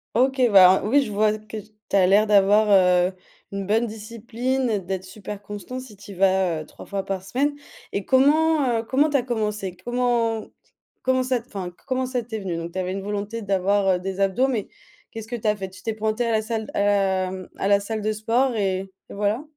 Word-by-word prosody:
OK. 265 +2 +2
Bah, 190 -2 +9
hein, - - -1
oui, 275 +7 +4
je 215 - -6
vois 215 +1 +2
que 215 0 -9
tu 210 0 -8
as 190 -2 +5
l'air 205 +3 +4
d'avoir, 210 +1 +4
heu, 180 -2 +4 0.4
une 200 -1 -4
bonne 225 +4 +1
discipline, 230 +2 -2
d'être 190 0 -3
super 200 +1 -8
constant, 205 +5 -7
si 250 -5 -12
tu 200 +1 -12
y - - -8
vas, 190 -3 +2
heu, 155 - -9
3 - - -13
fois 200 -1 -3
par 195 -1 -4
semaine 275 +9 -1 0.4
et 200 - -3
comment, 285 -1 +3
heu, 225 - -3
comment 280 +6 +2
tu 285 - +2
as 250 - -1
commencé? 210 -6 -3
Comment 235 +1 0 0.6
comment 260 0 +1
ça 255 -1 0
t - - -24
enfin, 195 -6 -5
co - - -32
comment 260 -1 0
ça 250 -1 -2
t'es 220 -1 -6
venu? 185 -4 -3
Donc 170 0 -6
tu 185 - -3
avais 185 0 -2
une 195 - -4
volonté 205 +3 -4
d'avoir, 200 0 +1
heu, - - -8
des 190 +1 -5
abdos 195 +7 +2
mais 230 -7 -2 0.4
qu'est-ce 225 -1 -8
que 240 - -4
tu 220 -2 -4
as 210 - +3
fait? 190 -2 -6
Tu 185 -1 -14
t'es 225 - -2
pointé 220 +2 -1
à - - 0
la 220 - +2
salle 220 -1 -4
à - - +1
la 190 -2 +1
mmh 185 -1 -8
à - - -1
la 200 0 +4
salle 215 +2 -4
de 215 +1 0
sport 235 +5 +1
et 195 -2 -1 0.2
et - - -9
voilà? 210 +7 0
210 Hz, 235 wpm, -23 LUFS, 195-240 Hz, 0.6 s, Bah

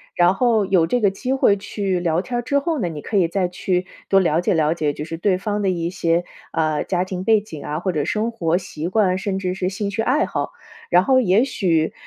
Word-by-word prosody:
然 175 +1 +4
后 230 -2 +2
有 185 -4 +3
这 245 +8 0
个 205 - +4
机 250 +7 -3
会 205 -6 +3
去 195 -2 -2
聊 170 -1 0
天 240 +5 -4
儿 - - 0
之 255 +4 0
后 315 +1 -2
呢， 190 - -1
你 155 -3 -6
可 210 - -2
以 180 -3 +4
再 185 +2 0
去 180 0 -1 0.2
多 195 - +4
了 165 -3 +2
解 175 - +1
了 160 -2 +2
解， 150 -3 -1
就 150 - -6
是 165 +1 -6
对 185 +2 +1
方 210 +1 -2
的 195 - +1
一 170 -2 -1
些， 170 -1 0 0.3
啊， 155 -2 0
家 180 -1 0
庭 185 -1 -5
背 220 -1 +4
景 160 -8 -9
啊， 150 +1 -3
或 185 +2 -1
者 150 -4 -1
生 215 +2 -1
活 170 -7 0
习 170 -4 -5
惯， 185 -1 +2
甚 195 0 -2
至 185 -1 -2
是 185 -1 -2
兴 200 +1 -3
趣 205 +3 -2
爱 260 +6 +2
好。 - - -3 0.4
然 180 +1 +5
后 260 +5 +4
也 210 -1 +3
许， 175 - 0
185 Hz, 270 characters per minute, -21 LUFS, 170-210 Hz, 0.4 s, 然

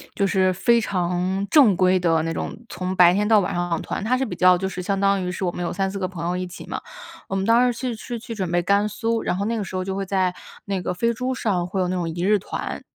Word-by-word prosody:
就 200 - +1
是 185 -1 +2
非 235 +6 +3
常 185 -1 -1
正 260 -11 +6
规 185 +1 +3
的 165 -2 +2
那 165 - -2
种， - - -4
从 185 +1 -4
白 180 -1 +7
天 205 +2 +1
到 215 -1 +5
晚 180 - -2
上 175 -2 -1
团。 - - -4
它 240 +5 +1
是 265 - 0
比 225 - -5
较 180 0 +5
就 190 +1 -2
是 185 - -5
相 195 +2 -1
当 200 0 +2
于 180 - -2
是 180 +2 -4
我 180 - 0
们 175 - -6
有 170 - -2
3-4 195 +1 -2
个 185 - -1
朋 175 -3 -6
友 180 +1 -1
一 185 - -3
起 180 - -10
嘛， - - -4 0.5
我 195 - -3
们 190 - 0
当 235 +3 +4
时 - - -12
去 255 -1 -2
是 240 - -5
去 230 +1 -7
准 190 -5 -3
备 175 0 +1
甘 200 +3 +2
肃， 225 +2 -1
然 - - -1
后 200 - -1
那 230 +2 -1
个 210 - -2
时 190 - -7
候 185 - -1
就 190 +1 -3
会 195 0 -3
在 185 -2 0 0.3
那 195 -2 -3
个 180 - -2
飞 230 +6 0
猪 255 +3 -2
上 185 -7 -1
会 190 +1 -2
有 180 - 0
那 185 - -1
种 175 -2 -2
一 170 +2 -4
日 205 +2 +3
团。 195 - -5
190 Hz, 310 characters per minute, -23 LUFS, 180-210 Hz, 0.5 s, 白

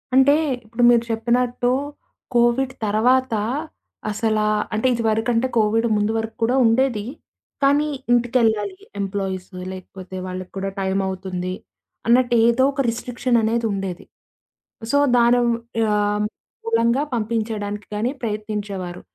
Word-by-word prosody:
అంటే 265 +2 +6 0.3
ఇప్పుడు 230 +2 -2
మీరు 235 -1 +5
చెప్పినట్టు 245 +2 +1 0.6
కోవిడ్ 240 +2 +3
తరువాత 245 +4 +2 0.8
అసలా 215 0 0 0.3
అంటే 220 +4 +1
ఇదివరకంటే 230 +1 +1
కోవిడ్ 225 +1 +2
ముందు 210 +1 +1
వరకు 225 0 -4
కూడా 240 +3 +2
ఉండేది. 230 -2 +2 0.6
కానీ, 290 +2 +4 0.3
ఇంటికెళ్ళాలి 240 - +1 0.2
ఎంప్లాయీస్, 195 -2 -3 0.2
లేకపోతే 185 0 -9
వాళ్ళకి 185 0 -6
కూడా 195 0 -2
టైమవుతుంది. 190 -1 -2 0.5
అన్నట్టు 240 0 +4
ఏదోక 265 +4 +3
రిస్ట్రి‌క్షననేది 235 -1 0
ఉండేది. 195 -3 -4 0.9
సో 285 - +3 0.2
దాని 240 +1 +5 0.4
యా 210 -1 +2 0.7
మూలంగా 230 +4 +2
పంపించడానికి 215 -2 -2
గానీ, 230 +5 0
ప్రయత్నించేవారు. 210 -5 -4
225 Hz, 100 wpm, -22 LUFS, 205-240 Hz, 0.9 s, అంటే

